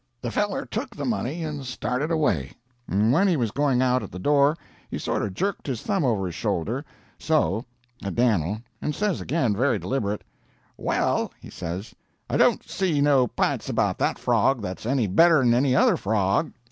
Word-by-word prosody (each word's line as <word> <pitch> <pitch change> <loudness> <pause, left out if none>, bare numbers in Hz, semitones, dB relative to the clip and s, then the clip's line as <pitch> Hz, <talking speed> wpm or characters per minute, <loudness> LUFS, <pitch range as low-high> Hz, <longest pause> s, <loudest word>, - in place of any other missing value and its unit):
"The 120 -1 -4
feller 205 - -1
took 235 +2 -5
the - - -4
money 170 - -2
and 150 -3 -4
started 130 +3 -2
away; 100 - 0 0.3
and 105 +5 +2
when 195 +7 +4
he 175 -4 +2
was 115 -5 0
going 135 -2 +2
out 125 0 +2
at - - -8
the - - -7
door, 145 - +3 0.3
he - - -4
sorter 105 - -1
jerked 195 - -3
his 125 -5 -3
thumb 195 -5 0
over 110 -7 +1
his 90 - -4
shoulder 105 - -2 0.4
so 115 - +1 0.4
at 100 - -4
Dan'l, 110 -3 +1 0.2
and 150 - -2
says 205 -3 -1
again, 125 -10 0
very 130 +6 +2
deliberate, 105 -6 -2 0.5
'Well,' - - 0
he - - -12
says, 90 +5 -6 0.4
'I - - +2
don't - - +3
see 180 -6 0
no 140 -3 +4
p'ints - - -1
about - - 0
that - - +1
frog 135 -5 +2
that's 95 +3 -5
any 130 -2 +2
better'n 130 - +5
any 130 +1 +3
other - - +4
frog.' 100 - +1
125 Hz, 180 wpm, -25 LUFS, 105-150 Hz, 0.5 s, better'n